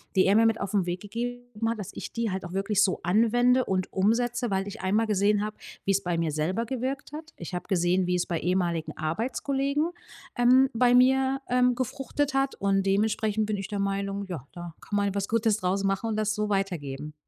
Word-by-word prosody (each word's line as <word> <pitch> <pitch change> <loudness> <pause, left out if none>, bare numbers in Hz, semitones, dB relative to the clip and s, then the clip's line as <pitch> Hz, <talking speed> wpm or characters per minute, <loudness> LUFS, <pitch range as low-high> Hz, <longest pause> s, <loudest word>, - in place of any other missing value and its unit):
die 190 - +5
er 200 +2 +4
mir 225 - +5
mit 225 -1 +2
auf 200 0 -4
'n 195 -3 +2
Weg 175 0 -3
gegeben 235 +1 -4
hat, 230 -1 -2
dass 205 -1 -6
ich - - -7
die 230 -3 -1
halt 190 0 -4
auch 175 - -8
wirklich 195 +1 +2
so 190 - +1
anwende 240 +7 +3
und 185 -1 -1
umsetze, 235 +4 +1
weil 195 0 0
ich 205 +2 -7
einmal 210 +4 +1
gesehen 205 0 +2
habe, 215 0 -5 0.3
wie's 195 0 +1
bei 175 -2 -1
mir 165 -2 0
selber 165 +10 -1
gewirkt 260 +3 -4
hat. 315 +1 -8
Ich 170 +1 -8
habe 180 - -4
gesehen, 180 0 +2
wie's 180 -1 +1
bei 170 -2 -2
ehemaligen 175 -2 -1
Arbeitskollegen, 270 - -1 0.5
ähm, 255 +2 +5
bei 245 +1 +4
mir, 265 +2 +4
ähm, 250 0 +3
gefruchtet 270 +3 -2
hat 270 0 +1
und 195 -1 +1
dementsprechend 215 +2 +1
bin 215 -1 -1
ich 195 0 -5
der 205 -2 -4
Meinung: 200 0 -2
Ja, 160 -8 -6
da 175 -2 -8
kann 205 - -5
man 205 - +2
halt 200 -1 -2
was 200 -1 -1
Gutes 225 -2 +2
draus 195 0 -1
machen 195 +3 0
und 220 - -1
das 215 0 0
so 210 0 -1
weitergeben. 155 -7 -3
205 Hz, 215 wpm, -27 LUFS, 190-240 Hz, 0.5 s, die